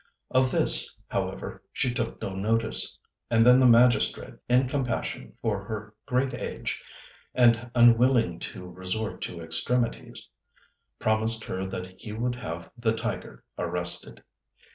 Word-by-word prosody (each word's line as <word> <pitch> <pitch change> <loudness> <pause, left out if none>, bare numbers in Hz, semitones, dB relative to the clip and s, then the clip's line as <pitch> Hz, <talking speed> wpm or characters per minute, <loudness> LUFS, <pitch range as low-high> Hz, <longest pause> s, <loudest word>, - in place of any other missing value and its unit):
Of 130 0 +3
this, - - +4
however, - - -4
she 125 - -1
took 115 -2 -3
no 95 - -3
notice; 110 +4 0 0.3
and 115 -1 +4
then 125 +1 +7
the 130 - +6
magistrate, 120 +1 +4 0.2
in 125 +1 +4
compassion 125 -3 -3
for 105 -3 -1
her 105 0 -6
great 130 0 +1
age - - -4 0.5
and 120 -1 +4
unwilling 120 -5 +4
to 90 - -7
resort 95 +4 -3
to 85 - -5
extremities, 115 +9 -2 0.7
promised 110 +1 +2
her 95 +1 -4
that 95 -1 -7
he 105 -2 -6
would 120 +3 -1
have 85 -8 -7
the 115 -2 0
tiger 115 - -5 0.2
arrested. 85 0 -2
115 Hz, 130 wpm, -27 LUFS, 95-125 Hz, 0.7 s, then